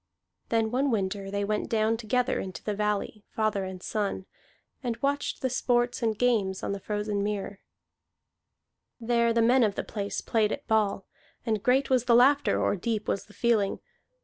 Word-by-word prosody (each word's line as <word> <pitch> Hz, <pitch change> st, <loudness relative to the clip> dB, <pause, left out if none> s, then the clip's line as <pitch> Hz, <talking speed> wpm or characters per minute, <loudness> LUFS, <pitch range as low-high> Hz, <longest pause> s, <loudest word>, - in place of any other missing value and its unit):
Then 225 Hz, -1 st, +1 dB
one 270 Hz, +3 st, +1 dB
winter 195 Hz, -3 st, -1 dB
they 200 Hz, 0 st, -1 dB
went 210 Hz, 0 st, -2 dB
down 220 Hz, 0 st, +2 dB
together 245 Hz, +3 st, 0 dB
into 185 Hz, -1 st, -6 dB
the 210 Hz, -, -1 dB
valley, 210 Hz, 0 st, -2 dB
father 215 Hz, -3 st, -1 dB
and 185 Hz, -1 st, -7 dB
son, 205 Hz, -3 st, -2 dB, 0.6 s
and 240 Hz, -4 st, -2 dB
watched 280 Hz, +2 st, -1 dB
the 260 Hz, -, +2 dB
sports 245 Hz, 0 st, +1 dB
and 220 Hz, -2 st, 0 dB
games 210 Hz, -6 st, +1 dB
on -, -, -2 dB
the 200 Hz, -, -3 dB
frozen 210 Hz, 0 st, -2 dB
mere. 205 Hz, -1 st, -3 dB, 1.4 s
There 235 Hz, 0 st, +2 dB
the 230 Hz, 0 st, +3 dB
men 250 Hz, +2 st, +5 dB
of 205 Hz, -3 st, +1 dB
the -, -, -2 dB
place 205 Hz, -1 st, -4 dB
played 220 Hz, -2 st, +1 dB
at -, -, -4 dB
ball, 205 Hz, -3 st, +1 dB, 0.4 s
and 220 Hz, -3 st, 0 dB
great 260 Hz, +4 st, +2 dB
was 250 Hz, -2 st, +3 dB
the 235 Hz, -, +5 dB
laughter 275 Hz, +4 st, +4 dB
or -, -, +1 dB
deep 215 Hz, +2 st, -2 dB
was 195 Hz, -, -1 dB
the 210 Hz, -, -18 dB
feeling. 220 Hz, -4 st, +1 dB
220 Hz, 175 wpm, -28 LUFS, 205-240 Hz, 1.4 s, men